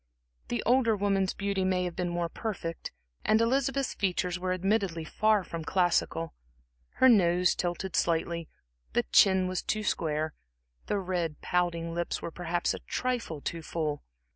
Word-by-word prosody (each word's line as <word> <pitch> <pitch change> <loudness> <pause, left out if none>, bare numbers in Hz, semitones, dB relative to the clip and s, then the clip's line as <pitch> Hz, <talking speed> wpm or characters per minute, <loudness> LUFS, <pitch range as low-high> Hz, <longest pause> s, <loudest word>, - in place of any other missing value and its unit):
The 120 - -2
older 240 -2 +4
woman's 195 -2 +1
beauty 200 -1 -1
may 185 -1 +1
have 175 -2 -3
been 180 -2 -1
more 175 0 -1
perfect. 165 -3 -5 0.3
Elizabeth's 265 +5 +2
features 180 -2 -1
were 185 0 -1
admittedly 185 -2 0
far 215 +5 +2
from 165 -2 -6
classical. 165 -2 +1 0.6
Her 260 - +5
nose 180 -6 +5
tilted 175 +1 -3
slightly, 170 0 0 0.4
the - - +2
chin 190 -1 +5
was 185 -1 -2
too 215 0 -1
square, 155 -5 -1 0.5
the 205 - 0
red, 175 -5 -2
pouting 170 -2 0
lips 170 0 -2
were 170 - -5
perhaps 175 0 -1
a - - -6
trifle 245 - -3
too 165 +3 -4
full. 155 -2 -2
180 Hz, 145 wpm, -29 LUFS, 170-200 Hz, 0.6 s, Her